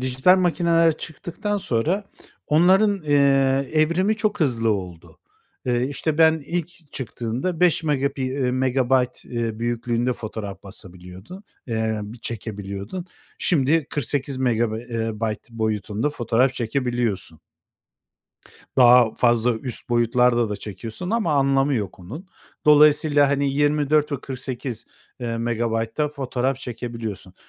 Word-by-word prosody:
dijital 130 +9 +3
makineler 170 -2 +2
çıktıktan 175 +6 -4
sonra 175 - -1 0.4
onların, 190 +5 +4
eee, 140 -2 +3
evrimi 170 +7 +2
çok 210 -2 -1
hızlı 115 -7 +1
oldu. 90 -5 -5 0.5
Eee, 125 0 +1
işte, 155 +2 -2
ben 160 -1 +4
ilk 170 -2 -5
çıktığında 130 - -4
beş 180 -2 +3
megapi 140 -2 0
eee, 130 0 -1
megabayt, 130 0 +1
eee, 115 -2 -3
büyüklüğünde 120 +1 -1
fotoğraf 105 -3 -7
basabiliyordu 95 - -11 0.2
eee, 110 -2 -1 0.2
çekebiliyordun. 105 - -6 0.3
Şimdi 150 -1 +2
kırk 145 - -2
sekiz 135 +1 -2
megabe 120 -3 0
eee, 115 -1 -1
bayt 110 0 -3
boyutunda 110 +2 -2
fotoğraf 125 -1 +1
çekebiliyorsun. 120 - -2 1.4
Daha 125 -3 +6
fazla 120 0 +2
üst 125 -1 -7
boyutlarda 120 0 +2
da 105 - -3
çekiyorsun 110 - -7
ama 220 -8 +1
anlamı 135 0 +2
yok 105 -6 -3
onun. 130 - -9 0.4
Dolayısıyla, 150 -1 +5
hani, 140 0 +1
yirmi 145 0 +1
dört 150 -1 +3
ve 140 - -2
kırk 135 -2 -7
sekiz 125 -3 -5 0.3
eee, 115 -1 -3
megabaytta 115 +4 -1
fotoğraf 135 -2 -2
çekebiliyorsun 115 -6 -6
130 Hz, 120 wpm, -23 LUFS, 115-150 Hz, 1.4 s, Daha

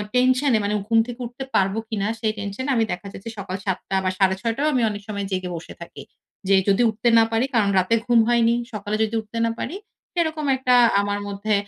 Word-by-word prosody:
টেনশনে 255 0 +3
মানে 205 +1 -1
ঘুম 225 0 +4
থেকে 245 0 -7
উঠতে 245 +3 -7
পারব 195 0 +3 0.2
কিনা 205 -2 -1
সেই 220 -2 0
টেনশনে 205 +7 -4
আমি 230 - +3
দেখা 180 +2 -5
যাচ্ছে 210 +4 -8
সকাল 190 -1 -5
৭ 190 -2 0
টা 195 - 0
বা 185 - +1
সাড়ে 190 -1 +3
৬ 230 +1 0
টায়ও 295 +4 +1
আমি 250 - +2
অনেক 205 -1 -6
সময় 200 -2 -3
জেগে 185 -1 -2
বসে 165 - -8
থাকি। - - -9 0.5
যে 195 - +5
যদি 200 +4 +3
উঠতে 220 +2 0
না 225 - +7
পারি? 225 +3 +2
কারণ 210 -3 +3
রাতে 185 +5 +2
ঘুম 240 -1 +4
হয়নি। 235 -1 +3 0.2
সকালে 210 0 -3
যদি 220 +1 -2
উঠতে 220 +1 -9
না 230 - 0
পারি? 345 - -4 0.4
সেরকম 315 -3 -1
একটা 255 -1 +3 0.3
আমার 205 0 -2
মধ্যে 200 +1 -2
220 Hz, 220 wpm, -23 LUFS, 200-240 Hz, 0.5 s, না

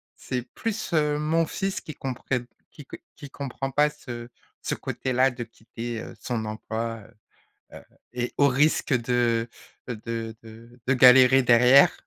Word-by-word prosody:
c'est 125 -1 -4
plus, 220 -4 -4
heu, 150 -2 +2
mon 160 +2 +1
fils 195 +4 -3
qui 155 - -9
comprenne 125 -1 -3 0.3
qui 145 - -13
qu - - -9 0.2
qui 145 -2 -10
comprend 135 0 -5
pas 150 +3 +3
ce 120 -5 -9 0.3
ce - - -2
côté-là 130 +1 0
de 125 -1 -6
quitter, 115 0 -7
heu, - - -9
son 115 -3 -3
emploi, 110 +1 -4
heu. - - -19 0.6
Heu - - -11 0.3
et 120 0 -3
au 140 - +5
risque 145 +2 +2
de, 120 -1 +1 0.4
heu, 125 - -3
de 115 0 -5
de 115 +2 -15
de 135 - +3
galérer 130 +1 +7
derrière 125 +3 +6
125 Hz, 160 wpm, -25 LUFS, 115-140 Hz, 0.6 s, galérer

